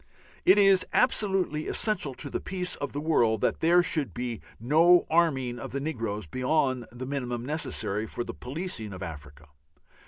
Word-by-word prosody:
It 190 - +6
is 195 -2 +5
absolutely 190 - +1
essential 175 - 0
to - - -7
the - - -2
peace 180 -1 -2
of 145 -1 -4
the 145 - -4
world 120 -9 +2
that - - 0
there 175 +2 +4
should 155 -5 0
be 120 -2 -4 0.2
no 165 +9 +5
arming 135 -8 +1
of - - -7
the 140 - -1
negroes 115 - -3
beyond 130 - 0
the 120 +2 -7
minimum 125 -3 -3
necessary 110 -8 -1
for 120 - -4
the - - -7
policing 130 - -5
of 95 0 -7
Africa. 75 -2 -10
135 Hz, 165 wpm, -27 LUFS, 120-170 Hz, 0.2 s, It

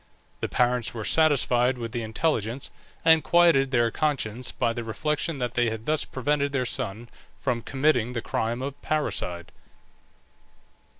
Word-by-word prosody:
The - - -3
parents 125 -2 +1
were 110 -2 -4
satisfied 130 -5 +3
with 115 -2 -5
the 120 - -3
intelligence, 115 +1 -2 0.3
and 160 -1 +6
quieted 170 -6 +4
their 120 -3 +2
conscience 130 -6 -1
by 115 -2 0
the 120 0 -4
reflection 150 +7 -2
that 125 -2 -2
they 120 -1 +2
had 110 0 -6
thus 155 0 0
prevented 140 +2 -1
their 130 -2 0
son 115 0 -4 0.3
from 125 -4 -1
committing 130 -3 +1
the 120 - -2
crime 120 +4 -2
of 140 0 -6
parricide. 90 - -2
125 Hz, 145 wpm, -26 LUFS, 115-145 Hz, 0.3 s, and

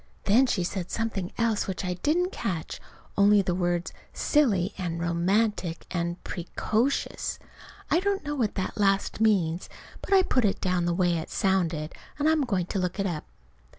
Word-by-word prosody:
Then 240 +6 +4
she 185 -7 0
said 180 0 -3
something 215 -5 -2
else 230 -3 +1
which 190 0 -3
I 180 - -1
didn't 330 - +1
catch, 170 - -4 0.3
only 200 0 +5
the 180 - 0
words 175 -1 -1 0.2
"silly" 210 - +2
and 170 -3 -3
"romantic," 175 +1 0
and 170 -1 -1
"pre 175 -1 -6
co 220 +3 +2
shus." 280 - -2 0.5
(I 335 - +5
don't 395 -1 -1
know 295 - -2
what 240 -7 -1
that 190 +2 -3
last 195 +1 +1
means, 185 -6 +2 0.3
but - - -8
I 385 -1 +6
put 255 -8 +1
it 200 -2 +1
down 180 -2 0
the 175 0 +1
way 175 -2 +2
it 160 - -7
sounded, 175 -6 0 0.2
and 295 +1 +1
I'm 315 -3 +3
going 195 -7 0
to 195 - -2
look 180 +1 -2
it 195 - +1
up.) 170 -5 -3
195 Hz, 185 wpm, -27 LUFS, 175-225 Hz, 0.5 s, I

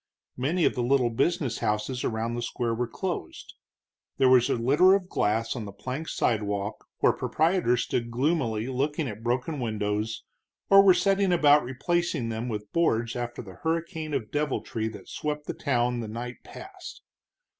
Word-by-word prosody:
Many 155 +7 +1
of - - +3
the 125 - -2
little 125 -1 +2
business 130 0 0
houses 105 +5 -1
around 115 +1 -1
the 120 - -3
square 120 0 -2
were 120 +1 -1
closed. 175 - -5 0.6
There 130 - +4
was 125 -2 +5
a - - +2
litter 145 +11 +5
of 190 -2 -2
glass 115 +3 0
on 115 -4 -4
the 100 - -7
plank 130 +10 -5
sidewalk, 105 -2 -1
where - - +5
proprietors 160 -7 +1
stood 120 -1 -2
gloomily 120 -4 0
looking 140 +4 -1
at 105 -1 -7
broken 125 +6 -1
windows, 110 -1 -2 0.5
or 195 0 +10
were 190 -2 +6
setting 195 +1 +2
about 150 -4 +5
replacing 140 0 -1
them 115 +2 -3
with 105 -2 -5
boards 115 -9 +1
after 120 0 -4
the 95 -4 -12
hurricane 160 -2 -2
of 115 -6 -3
deviltry 145 -6 -2
that 110 - -9
swept 150 0 -4
the - - -3
town 125 -3 0
the 115 - -4
night 120 +3 -6
past. 385 -2 -11
125 Hz, 165 wpm, -27 LUFS, 115-155 Hz, 0.6 s, or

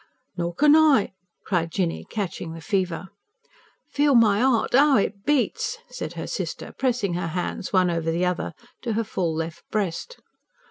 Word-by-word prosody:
"Nor 170 -1 -3
can 300 - +6
I," 300 -12 +4 0.3
cried 170 -3 0
Jinny, 175 -3 -2
catching 180 -5 -4
the 165 - -8
fever. 185 -1 -1 0.8
"Feel 285 -1 +3
my 215 -3 +5
'eart, 255 -3 +2
'ow 280 +1 +6
it 200 0 -1
beats," 445 - 0
said - - -5
her - - -5
sister, - - -5
pressing 245 -8 0
her 175 0 -2
hands, 180 +2 -3
one 185 -2 +3
over 165 -1 -1
the 170 +2 +1
other, 180 -1 -2 0.3
to 235 -3 -2
her 225 +2 0
full 180 -5 -2
left 165 0 -4
breast. 210 - -3
200 Hz, 165 wpm, -24 LUFS, 175-260 Hz, 0.8 s, can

